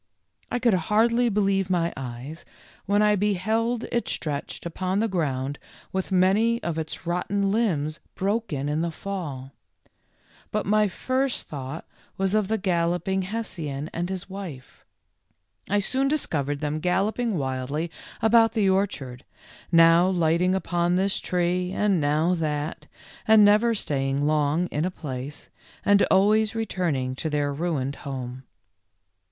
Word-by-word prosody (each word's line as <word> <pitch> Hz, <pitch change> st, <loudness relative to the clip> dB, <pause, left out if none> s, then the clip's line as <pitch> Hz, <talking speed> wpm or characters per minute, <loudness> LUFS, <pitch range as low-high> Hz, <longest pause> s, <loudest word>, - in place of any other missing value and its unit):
I 245 Hz, -, +1 dB
could 240 Hz, -3 st, +3 dB
hardly 230 Hz, +7 st, +3 dB
believe 195 Hz, -2 st, +1 dB
my 170 Hz, -2 st, +1 dB
eyes 130 Hz, +5 st, -7 dB, 0.4 s
when 205 Hz, +1 st, +3 dB
I 210 Hz, 0 st, +4 dB
be 205 Hz, +1 st, +1 dB
held 225 Hz, +5 st, 0 dB
it 235 Hz, -, 0 dB
stretched 145 Hz, 0 st, -4 dB
upon 185 Hz, +3 st, -2 dB
the 225 Hz, +2 st, +2 dB
ground 145 Hz, -7 st, -2 dB, 0.3 s
with 190 Hz, +1 st, -3 dB
many 200 Hz, +6 st, +3 dB
of 165 Hz, -2 st, -2 dB
its 160 Hz, +3 st, -6 dB
rotten 195 Hz, +3 st, 0 dB
limbs 165 Hz, -9 st, 0 dB, 0.2 s
broken 195 Hz, -8 st, -1 dB
in 150 Hz, +2 st, 0 dB
the 170 Hz, -, 0 dB
fall; 155 Hz, -8 st, -6 dB, 1.0 s
but 210 Hz, -1 st, -1 dB
my 210 Hz, +1 st, +3 dB
first 260 Hz, +7 st, -1 dB
thought 140 Hz, +1 st, -6 dB, 0.3 s
was 195 Hz, 0 st, 0 dB
of 215 Hz, -2 st, +2 dB
the 220 Hz, +2 st, 0 dB
Galloping 180 Hz, 0 st, 0 dB
Hessian 170 Hz, -8 st, -4 dB
and 175 Hz, +1 st, -2 dB
his 190 Hz, -2 st, -4 dB
wife. 185 Hz, -10 st, -9 dB, 0.9 s
I 205 Hz, -, +2 dB
soon 265 Hz, +7 st, 0 dB
discovered 145 Hz, -, -1 dB
them 150 Hz, 0 st, -1 dB
galloping 200 Hz, +5 st, 0 dB
wildly 140 Hz, +4 st, -2 dB, 0.3 s
about 225 Hz, 0 st, +5 dB
the 215 Hz, -4 st, +2 dB
orchard, 165 Hz, -10 st, -1 dB, 0.5 s
now 165 Hz, +1 st, +6 dB
lighting 175 Hz, +1 st, +2 dB
upon 175 Hz, -2 st, 0 dB
this 190 Hz, +1 st, +1 dB
tree 180 Hz, 0 st, 0 dB
and 200 Hz, -5 st, +2 dB
now 155 Hz, +4 st, +2 dB
that, 150 Hz, -1 st, -3 dB, 0.4 s
and 220 Hz, -1 st, +7 dB
never 215 Hz, +3 st, +4 dB
staying 140 Hz, -5 st, -1 dB
long 150 Hz, +2 st, +2 dB
in 150 Hz, -, -1 dB
a 180 Hz, -, +1 dB
place, 145 Hz, -4 st, -7 dB, 0.3 s
and 205 Hz, 0 st, +5 dB
always 215 Hz, +3 st, +3 dB
returning 170 Hz, -12 st, -1 dB
to 160 Hz, -, -2 dB
their 145 Hz, -1 st, 0 dB
ruined 140 Hz, -4 st, -2 dB
home. 130 Hz, -2 st, -6 dB
180 Hz, 140 wpm, -25 LUFS, 150-205 Hz, 1.0 s, and